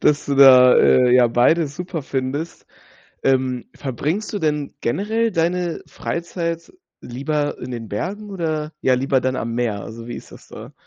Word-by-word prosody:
dass 150 Hz, 0 st, +2 dB
du 140 Hz, -, 0 dB
da, 130 Hz, -2 st, +8 dB
äh, 125 Hz, -1 st, +5 dB
ja 120 Hz, -1 st, +5 dB
beides 140 Hz, +5 st, +2 dB
super 180 Hz, -3 st, -5 dB
findest. 135 Hz, +5 st, -4 dB, 0.6 s
Ähm, 130 Hz, -2 st, +1 dB
verbringst 150 Hz, -, -3 dB
du -, -, -1 dB
denn 150 Hz, -3 st, -2 dB
generell 220 Hz, -, 0 dB
deine 175 Hz, 0 st, -1 dB
Freizeit 170 Hz, -1 st, -4 dB, 0.3 s
lieber 145 Hz, +4 st, -3 dB
in -, -, -7 dB
den 115 Hz, -3 st, -6 dB
Bergen 200 Hz, -, -5 dB
oder, 155 Hz, -4 st, -3 dB
ja, 130 Hz, -, +3 dB
lieber 130 Hz, 0 st, +1 dB
dann 130 Hz, 0 st, 0 dB
am 115 Hz, 0 st, -3 dB
Meer? 115 Hz, -4 st, -1 dB
Also, 115 Hz, +1 st, -9 dB
wie 120 Hz, -, -6 dB
ist -, -, -10 dB
das -, -, -15 dB
da? -, -, -11 dB
140 Hz, 165 wpm, -20 LUFS, 125-170 Hz, 0.6 s, da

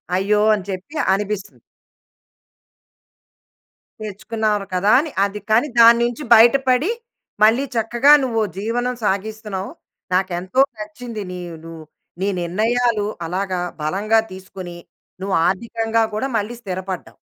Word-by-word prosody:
అయ్యో! 205 Hz, +3 st, +2 dB
అని 200 Hz, -, -6 dB
చెప్పి 190 Hz, +11 st, -6 dB, 0.2 s
అనిపిస్తుంది. 205 Hz, 0 st, -3 dB, 2.4 s
తెచ్చుకున్నారు 215 Hz, 0 st, -2 dB
కదా 190 Hz, +3 st, +2 dB
అని. 305 Hz, +1 st, -3 dB
అది. 200 Hz, +1 st, -5 dB
కానీ 230 Hz, +7 st, +4 dB
దాని 235 Hz, 0 st, +8 dB
నుంచి 240 Hz, +4 st, -4 dB
బయటపడి, 255 Hz, -, +4 dB, 0.5 s
మళ్ళీ 225 Hz, +5 st, +5 dB
చక్కగా 240 Hz, +5 st, +3 dB
నువ్వు 230 Hz, -4 st, 0 dB, 0.2 s
జీవనం 245 Hz, +5 st, -2 dB
సాగిస్తున్నావు. 205 Hz, -1 st, -3 dB, 0.4 s
నాకు 185 Hz, 0 st, +1 dB
ఎంతో 185 Hz, +8 st, -3 dB, 0.2 s
నచ్చింది. 215 Hz, +1 st, -7 dB
నీ 180 Hz, -, -6 dB, 0.3 s
ను 165 Hz, -, -9 dB, 0.5 s
నీ 195 Hz, -, +1 dB
నిర్ణయాలు 220 Hz, +5 st, +1 dB, 0.2 s
అలాగా 185 Hz, +2 st, -2 dB, 0.2 s
బలంగా 200 Hz, +8 st, +1 dB
తీసుకొని 185 Hz, -1 st, -9 dB, 0.5 s
నువ్వు 195 Hz, 0 st, -1 dB
ఆర్థికంగా 225 Hz, +3 st, 0 dB
కూడా 215 Hz, +6 st, -1 dB
మళ్ళీ 215 Hz, +3 st, -3 dB
స్థిరపడ్డావు. 190 Hz, -3 st, -6 dB
210 Hz, 110 wpm, -20 LUFS, 190-235 Hz, 2.4 s, దాని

